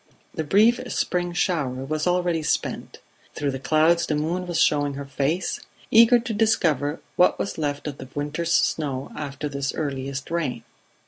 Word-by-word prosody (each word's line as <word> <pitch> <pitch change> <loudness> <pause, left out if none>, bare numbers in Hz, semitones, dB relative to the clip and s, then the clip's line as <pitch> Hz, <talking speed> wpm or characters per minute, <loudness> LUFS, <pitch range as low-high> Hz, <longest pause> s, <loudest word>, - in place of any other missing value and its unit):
The 160 - -2
brief 215 +10 +4
spring 175 -1 -1
shower 145 -8 -1
was 155 +3 -2
already 175 -2 +1
spent; 155 - -2 0.4
through 145 -1 -1
the 135 - -5
clouds 160 +5 +3
the 150 - 0
moon 170 +5 -2
was 175 -1 -1
showing 145 -2 +2
her 140 0 -6
face 140 +6 -1 0.3
eager 230 +2 +7
to 235 -1 -4
discover 165 - +1 0.2
what 180 - +4
was 195 - -4
left 145 -2 -2
of 145 -2 -5
the 130 - -8
winter's 155 +4 -2
snow 140 -5 0
after 145 0 -5
this 140 -1 -3
earliest 140 -1 -4
rain. 135 -9 -2
155 Hz, 165 wpm, -24 LUFS, 140-175 Hz, 0.4 s, eager